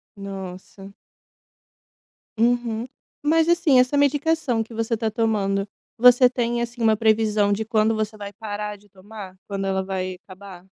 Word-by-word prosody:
Nossa. 195 0 -9 1.5
Uhum. 235 -1 +1 0.4
Mas 320 +2 +3
assim, 330 -7 +4
essa 255 +3 +2
medicação 285 -4 +1
que 225 - -14
você 225 +1 -1
tá 220 -1 -2
tomando 205 -3 0 0.3
você 250 +1 +7
tem, 240 -1 -1
assim, 240 0 -7
uma 220 -2 +3
previsão 215 -2 +2
de 220 +2 -2
quando 220 0 +1
você 215 0 -3
vai 205 0 -8
parar 210 -1 -5
de 205 0 -22
tomar, 195 0 -11
quando 195 -1 -3
ela 190 0 0
vai 185 -1 -4
acabar? 185 -1 -12
220 Hz, 145 wpm, -23 LUFS, 200-240 Hz, 1.5 s, você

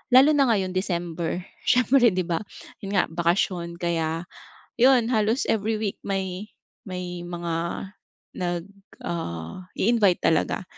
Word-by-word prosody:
lalo 275 +4 +8
na 280 -3 +4
ngayon 190 -2 -1
December 175 -2 -2 0.2
siyempre 250 0 +5
'di 185 0 0
ba? 170 -2 0 0.4
'Yun 195 0 -5
nga 185 - +5
bakasyon 170 0 0
kaya 165 -1 -1 0.5
yun 245 -1 +5
halos 225 +1 +1
every 220 0 0
week 205 -3 -2
may 195 0 -3 0.4
may 180 -2 -5
mga 170 -1 -4 0.8
nag 175 -1 -2 0.4
ah, 85 - -5
i-invite 205 -4 +3
talaga. 160 +3 +2
185 Hz, 125 wpm, -25 LUFS, 170-215 Hz, 0.8 s, lalo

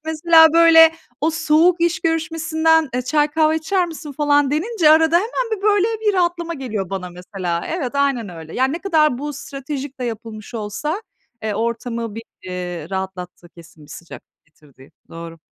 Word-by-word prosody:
Mesela, 320 +1 +5
böyle, 325 -1 +7 0.3
o 315 +2 +1
soğuk 330 +2 +2
iş 340 -2 +1
görüşmesinden, 320 -1 +1
eee, 250 - -1
çay, 295 +3 +1
kahve 315 0 +2
içer 355 +3 0
misin, 320 -3 -8
falan, 290 -1 +2
denince 330 +1 +2
arada 320 +1 +5
hemen 460 +5 -1
bir 390 - -15
böyle 410 -1 +3
bir 420 -2 +1
rahatlama 345 -2 -1
geliyor 215 - -5
bana, 185 -2 -5
mesela. 180 -1 -5
Evet, 290 -7 -3
aynen 275 -7 0
öyle. 165 -2 -10
Yani, 260 +2 +1
ne 330 - -3
kadar 310 -9 +1
bu 295 +1 -5
stratejik 275 0 -7
de 250 - -2
yapılmış 225 -1 -7
olsa, 265 - -4 0.4
eee, 215 -2 -2
ortamı 230 0 -3
bir, 225 - -7 0.2
eee, 180 -3 -6
rahatlattığı 185 -2 -6
kesin, 165 -2 -17
bir 145 - -18
sıcaklık 170 - -13
getirdiği. 145 -3 -21 0.2
Doğru. 165 0 -9
290 Hz, 165 wpm, -20 LUFS, 205-325 Hz, 0.4 s, böyle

